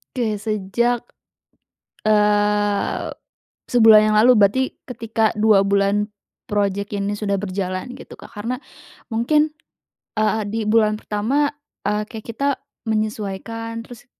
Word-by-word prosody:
Oke 225 -4 0
sejak, 215 +3 -1 0.9
eee, 210 -1 +2 0.6
sebulan 225 -3 +7
yang 215 - +2
lalu 235 +4 +6
berarti 205 +6 +4 0.3
ketika 225 -3 -1
2 215 -1 +5
bulan 200 +1 +2 0.4
project 200 0 -1
ini 205 +1 -2
sudah 200 -2 0
berjalan 190 +3 -3
gitu, - - -11
Kak, - - -14
karena 235 +6 -5 0.4
mungkin, 300 +7 +1 0.6
eee, 215 0 +1
di 220 +2 -3
bulan 215 -1 +4
pertama, 220 +7 0 0.4
eee, 210 0 -1
kayak 220 0 -8
kita 230 +6 -3 0.4
menyesuaikan 220 +1 -3
terus, 245 +1 -13
215 Hz, 115 wpm, -21 LUFS, 205-230 Hz, 0.9 s, sebulan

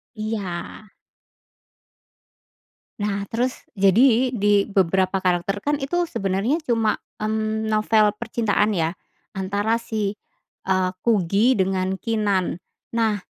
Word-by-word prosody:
Iya. 210 -5 -4 2.3
Nah 200 -1 -1
terus, 245 +4 -2
jadi 230 +6 +4
di 205 -3 +2
beberapa 190 0 +2
karakter 185 +2 0
kan 290 +7 -1
itu 350 +5 0
sebenarnya 200 - -1
cuma, 225 -5 +1 0.2
mmm, 220 0 -1
novel 215 -1 +3
percintaan 220 -2 0
ya 170 -3 0 0.4
antara 205 +4 -1
si, 210 -2 -2 0.5
eee, 185 -1 +1
Kugy 210 +2 +2
dengan 190 0 0
Keenan. 210 -5 0 0.4
Nah 220 -3 +1
210 Hz, 100 wpm, -23 LUFS, 190-225 Hz, 2.3 s, jadi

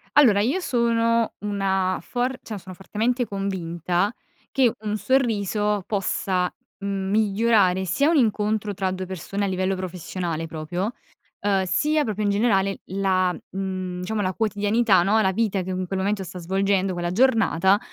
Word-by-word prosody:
Allora 235 -9 +6
io 270 - +1
sono 230 -5 +1
una 195 -2 0
for 250 +1 -2
cioè 215 -2 -6
sono 185 0 -10
fortemente 225 +7 -1
convinta 190 -1 -1 0.4
che 255 -4 +3
un 215 0 -2
sorriso 210 -5 +1
possa, 190 -2 0 0.3
mhmm, 195 -1 -3
migliorare 205 -3 +3
sia 280 - +2
un 335 - +3
incontro 215 -3 +1
tra 190 -1 -1
2 185 0 -4
persone 190 +2 -4
a - - 0
livello 185 0 0
professionale 175 -2 -4
proprio, 175 +8 -3 0.5
ehm, 195 -1 +2
sia 300 - +2
proprio 215 -4 -2
in 205 - +2
generale 200 -2 +2
la, 185 -1 +1 0.2
mhmm, 185 -1 -4
diciamo 210 +3 -2
la 185 -1 -1
quotidianità, 205 -2 +2
no, 205 +4 +3
la 190 -2 +2
vita 205 -2 0
che, 185 +1 -4
mhmm, 185 - -2
in 185 - -4
quel 190 +1 -2
momento 195 0 0
sta 180 0 -8
svolgendo 190 +2 +1
quella 175 0 -2
giornata 205 -4 +3
195 Hz, 155 wpm, -24 LUFS, 185-220 Hz, 0.5 s, Allora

